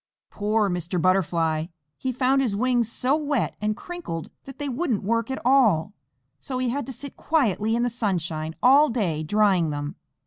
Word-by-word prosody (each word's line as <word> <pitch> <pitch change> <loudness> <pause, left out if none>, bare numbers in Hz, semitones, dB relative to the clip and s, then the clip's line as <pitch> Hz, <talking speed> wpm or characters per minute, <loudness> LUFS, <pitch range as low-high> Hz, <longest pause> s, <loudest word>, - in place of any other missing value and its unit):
Poor 210 +1 +1
Mr. 175 -1 -2
Butterfly! 165 -3 +1 0.3
He 260 - -3
found 260 +2 +2
his 230 -7 0
wings 240 0 +1
so 260 +4 +1
wet 290 -5 -1
and 210 0 -1
crinkled 345 - -6
that 270 - -10
they 290 - -4
wouldn't 260 - -1
work 230 +3 0
at 265 - -3
all, 220 -9 +3 0.5
so 260 -3 -5
he 255 -1 0
had 280 +3 -3
to - - -5
sit 280 +2 -9
quietly 225 - +1
in 240 - +1
the - - +2
sunshine 170 -8 -2
all 280 +4 +6
day 185 -10 -1
drying 190 -1 +2
them. 145 0 -4
225 Hz, 175 wpm, -24 LUFS, 175-260 Hz, 0.5 s, all